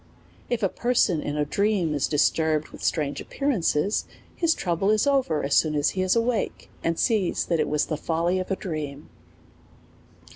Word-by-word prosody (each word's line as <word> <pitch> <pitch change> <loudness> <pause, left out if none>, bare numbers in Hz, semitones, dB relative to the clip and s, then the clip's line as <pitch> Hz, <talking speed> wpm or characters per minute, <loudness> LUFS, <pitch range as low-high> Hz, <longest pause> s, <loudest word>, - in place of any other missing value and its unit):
If 240 -3 -1
a - - +5
person 215 -7 +1
in 145 +1 -3
a 150 - +1
dream 195 -1 +1
is 145 -2 0
disturbed 155 0 +1
with - - -12
strange 145 -3 -1
ap - - -12
pearances, 205 - 0 0.3
his 330 -2 +2
trouble 180 +2 0
is 215 0 +3
over 270 - +1
as 140 - +1
soon 155 -1 +3
as 145 -1 +2
he 185 - -2
is 185 +3 +2
awake, 230 -1 -1
and 165 0 0
sees 210 -7 +1
that 170 -2 0
it - - +1
was 150 0 +1
the 155 - -3
folly 170 +4 0
of 185 - -4
his 195 - -1
dream. 150 -5 -5
170 Hz, 185 wpm, -25 LUFS, 150-210 Hz, 0.3 s, a